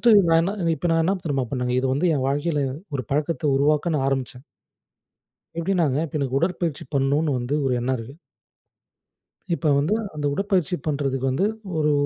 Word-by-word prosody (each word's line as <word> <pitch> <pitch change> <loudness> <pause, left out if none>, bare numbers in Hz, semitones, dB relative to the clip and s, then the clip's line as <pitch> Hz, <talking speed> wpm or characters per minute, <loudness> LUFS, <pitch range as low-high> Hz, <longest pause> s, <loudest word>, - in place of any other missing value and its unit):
First 235 -2 +5 0.2
நான் 165 0 +5
என்ன, 190 +4 0 0.2
இப்ப 175 - -2
நான் 165 0 +3
என்ன 195 +4 +2
தெரியுமா 135 -4 0
பண்ணேங்க? 125 -2 -1
இது 135 - 0
வந்து 155 +7 +1
என் 130 - -1
வாழ்க்கைல, 145 +2 0 0.3
ஒரு 130 - -1
பழக்கத்த 155 +3 -1
உருவாக்க 150 +4 +2
நான் 135 -3 +1
ஆரம்பிச்சேன். 130 -2 -3 1.1
எப்டின்னாங்க, 170 -5 +1
இப்ப 155 -1 -4
எனக்கு 135 -1 0
உடற்பயிற்சி 170 -2 -1
பண்ணுன்னு 140 +3 +2
வந்து, 120 +3 -3
ஒரு 125 - +1
எண்ணம் 130 +2 0
இருக்கு. 120 +5 -9 1.4
இப்ப 155 -3 +1
வந்து, 155 +8 +1 0.2
அந்த 150 -1 -3
உடற்பயிற்சி 190 -1 0
பண்றதுக்கு 135 -3 -1
வந்து 140 +10 +1 0.3
ஒரு, 150 0 +2
145 Hz, 165 wpm, -23 LUFS, 135-165 Hz, 1.4 s, First